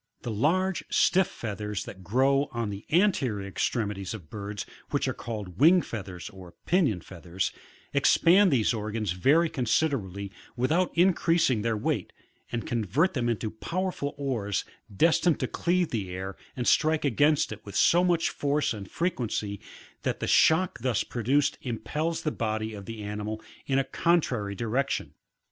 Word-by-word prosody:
] - - -49
18. 115 - -2
The 105 - -5
large 185 +5 +2
stiff" 190 0 +3
feathers 105 -2 -5
that 95 -1 -10
grow 135 - +2
on 115 -3 -2
the 100 +1 -7
anterior 140 - +2
extremi 105 +1 -1
ties 100 +2 -5
of 85 -8 -12
birds, 105 -1 -5 0.2
which - - 0
are - - 0
called 105 -6 -7
uing 170 +5 +6
feathers, 95 -5 -6
or 95 -4 -13
pinion 150 - +2
feathers, 90 +1 -4 0.4
expand 190 +4 +5
these 120 -4 +3
organs 110 -2 -2
very 140 - +3
considerably 120 - -1 0.3
without 160 +9 +2
increasing 170 - +3
their 115 0 0
weight, - - -2 0.4
and 120 -1 -3
convert 120 - +1
them 120 -5 0
into 110 -2 -2
powerful 170 - -3
oars 115 -9 -2 0.3
destined 165 - +3
to 130 - -1
cleave 175 +3 0
the 105 -6 -3
air, 95 +1 -5 0.2
and 125 - -2
strike 155 -1 +3
against 145 +2 +3
it 105 0 -8
with 100 - -9
so 175 +1 +5
much 175 -2 +2
force 145 -1 0
and 100 -3 -8
frequency, 115 - -2 0.4
that - - -2
the - - -2
shock 165 +3 +4
thus 120 -3 0
produced 130 +5 0
impels 150 +7 -3
the 155 - 0
body 110 -2 -2
of 100 -2 -8
the 115 -2 -6
animal 105 +1 -4 0.3
in 135 - +1
a 135 - +3
con 170 +5 +2
trary 105 - -3
direction. 125 +4 -1
120 Hz, 160 wpm, -27 LUFS, 105-155 Hz, 0.4 s, uing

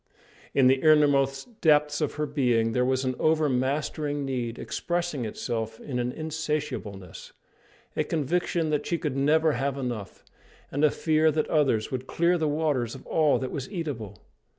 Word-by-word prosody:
In 135 - +5
the 130 +1 +4
innermost 145 - +3
depths 150 -1 +3
of 150 - -1
her 150 +1 -1
being 125 -6 +1
there 125 +2 +1
was 130 +1 +1
an 130 - 0
over 155 -1 +3
mastering 145 +2 -1
need, 120 -3 -3
expressing 175 -7 -2
itself 110 0 -4
in 125 -4 -4
an 125 0 -1
insatiableness, 150 - -4 0.6
a - - +1
conviction 165 +1 -1
that 150 -1 -1
she 170 - 0
could 150 -5 -3
never 155 +3 +3
have 140 +1 -1
enough, 120 -7 -5 0.5
and 145 +2 -1
a 155 - +7
fear 155 +1 +2
that 155 0 0
others 135 -9 +2
would 130 0 -4
clear 170 +1 +2
the 155 - +1
waters 145 -6 0
of 135 - -12
all 155 -3 +3
that 130 - -4
was 140 -4 -5
eatable. 140 - -5
145 Hz, 165 wpm, -27 LUFS, 125-155 Hz, 0.6 s, a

